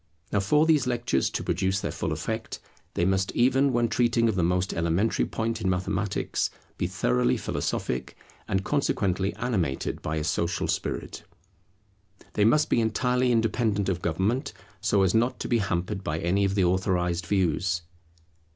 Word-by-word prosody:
Now 100 - +2
for 150 +11 +3
these 150 -5 +3
lectures 120 - 0
to - - -3
produce 95 +1 0
their - - -3
full - - -3
effect, - - -4 0.4
they 85 - +1
must 95 0 +1
even 135 +3 +3
when 120 -1 +2
treating 115 0 +2
of 110 - +2
the 95 - 0
most 90 +2 +1
elementary 85 +6 +1
point 115 0 -2
in 95 - +1
mathematics, 95 +2 -1 0.3
be - - +1
thoroughly 60 +1 +1
philosophic 65 0 -3 0.3
and 95 0 0
consequently 100 -8 0
animated 100 - -2
by 80 - -2
a 75 - -1
social 85 +2 -1
spirit. - - -3 1.1
They 105 - +3
must 150 +7 +4
be 115 - +2
entirely 125 +3 +1
independent 110 -3 +1
of 90 -2 -1
government, 95 +10 -1 0.3
so 100 -2 +2
as 95 - +2
not 120 +3 +1
to - - -3
be 120 - +2
hampered 95 +1 -2
by 75 -2 -2
any 90 +4 +1
of 100 0 0
the 100 - +3
authorized 90 -1 0
views. 90 -2 +1
100 Hz, 160 wpm, -26 LUFS, 90-115 Hz, 1.1 s, must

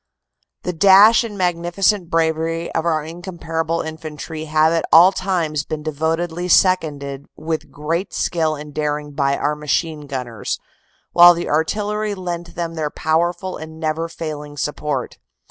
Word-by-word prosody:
"The 180 - -2
dash 200 +6 +7
and 215 -3 -6
magnificent 175 +1 +1
bravery 165 0 0
of 165 +1 -1
our 155 -2 +1
incomparable 165 -1 -3
Infantry 160 0 -7
have 155 +1 +3
at 165 - +1
all 175 +4 +8
times 170 -6 -1
been 155 0 -5
devotedly 160 +3 -2
seconded 145 -7 +2
with 160 0 -4
great 165 +6 -3
skill 160 -3 0
and 150 0 -9
daring 150 0 -2
by 140 -1 0
our 150 - 0
Machine 150 0 -2
Gunners, 125 -5 -4 0.6
while 175 0 +9
the 175 - -4
Artillery 210 +6 0
lent 175 -2 -5
them 170 -1 -3
their 155 -2 -2
powerful 175 +5 -1
and 160 0 -10
never 160 +1 -2
failing 150 -3 -6
support. 145 -2 -3
160 Hz, 140 wpm, -20 LUFS, 150-175 Hz, 0.6 s, while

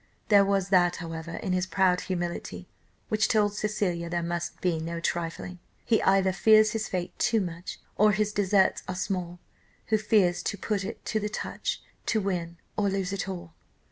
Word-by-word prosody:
There 200 -2 +7
was 195 -1 +1
that, 175 -2 +4
however, 165 0 -6
in 185 - -2
his 185 0 0
proud 185 0 +2
humility, 175 -2 -4 0.4
which 215 -2 +2
told 210 -2 +2
Cecilia 195 -5 -1
there 170 0 -1
must 170 0 -3
be 175 -3 0
no 170 +1 -4
trifling. 170 +2 -3 0.3
'He 225 - +3
either 190 -1 +3
fears 215 +1 +5
his 220 -1 -2
fate 180 -1 -3
too 220 +1 +3
much, 175 -2 -5 0.2
Or 210 +1 +5
his 210 +1 0
deserts 195 -1 +3
are 185 - -3
small, 180 -2 -3 0.5
Who 215 0 +3
fears 205 -4 +3
to 205 - -3
put 200 0 -1
it 215 +5 -7
to 220 - 0
the 210 0 -2
touch, - - -4 0.2
To 220 - +2
win 175 -4 -2 0.2
or 205 -2 +1
lose 195 -1 -2
it 195 0 -3
all. 175 -3 -7
190 Hz, 180 wpm, -27 LUFS, 175-210 Hz, 0.5 s, There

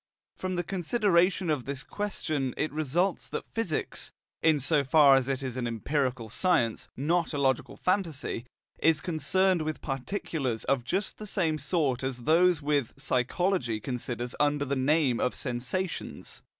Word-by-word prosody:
From 185 0 -3
the 175 - 0
consideration 185 -1 +2
of 145 -5 -1
this 140 -1 -4
question 155 - -2
it 155 - -1
results 155 +5 0
that - - -4
physics, 215 -9 -2 0.3
in 160 -2 +4
so 145 +2 +2
far 140 0 +6
as 135 -1 +2
it 135 0 -1
is 130 -1 -4
an 120 -2 -1
empirical 125 +1 -1
science, 120 - +1
not 160 +4 +1
a - - -1
logical 135 -3 0
phantasy, 165 - -1 0.3
is 160 -2 +4
concerned 180 +3 +1
with 155 0 -3
particulars 135 - -3
of 135 -3 +1
just 195 - -2
the 215 - -6
same 165 -6 0
sort 145 -4 0
as 130 -2 -3
those 165 +2 +4
which 145 -4 +1
psychology 130 - 0
considers 120 0 -4
under 145 -1 +2
the 140 +1 -1
name 135 -2 +2
of 125 - 0
sensations. 130 +9 -4
145 Hz, 150 wpm, -28 LUFS, 130-175 Hz, 0.3 s, far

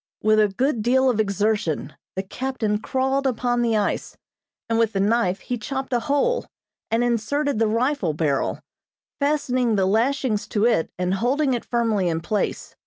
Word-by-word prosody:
With 215 0 +4
a 210 - +5
good 245 +4 0
deal 260 +3 +3
of 220 - -3
exertion, 200 -8 0 0.2
the 190 - -2
captain 220 -1 -2
crawled 265 +4 0
upon 245 -1 0
the 230 -2 +2
ice, 205 - -2 0.5
and 230 0 +1
with 225 -1 +2
the 195 - 0
knife 200 -2 +1
he 245 -1 -4
chopped 265 +3 -4
a 240 - +3
hole, 290 - 0 0.4
and 230 +2 +1
inserted 245 +3 0
the 225 - +3
rifle 230 - 0
barrel, 150 -3 0 0.6
fastening 255 -5 +1
the 195 -2 +2
lashings 230 +2 +1
to 210 +1 +1
it 195 -9 +2
and 180 +1 0
holding 260 +7 +1
it 240 - -2
firmly 225 -6 +1
in 165 -1 -1
place. 210 +5 -2
230 Hz, 170 wpm, -23 LUFS, 205-260 Hz, 0.6 s, a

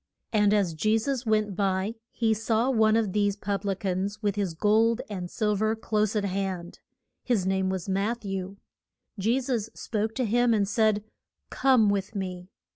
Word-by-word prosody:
And 210 -1 +4
as 200 -5 +2
Je 215 +8 +2
sus 250 +1 -2
went 215 -2 +1
by 195 +1 0 0.2
he 225 -1 +1
saw 225 +3 +1
one 220 -3 +4
of 215 -5 0
these 205 -1 +1
pub 200 -1 -3
li 200 -1 0
cans 195 +2 -2
with 205 -1 +1
his 195 -5 -2
gold 220 +5 +3
and 180 -3 -4
sil 210 +1 0
ver 215 +2 +1
close 215 -1 0
at 205 -1 +1
hand. 190 -2 -3 0.4
His 225 -7 +1
name 190 0 +1
was 190 -1 -3
Matth 205 +4 -1
ew. 195 0 -4 0.6
Je 230 +7 +2
sus 240 -5 -2
spoke 220 0 -2
to 255 - 0
him, 235 +1 +3
and 200 -2 +1
said, 215 -1 +2 0.5
Come 255 -5 +4
with 200 +1 -1
me. 185 -2 -5
210 Hz, 180 wpm, -27 LUFS, 195-220 Hz, 0.6 s, And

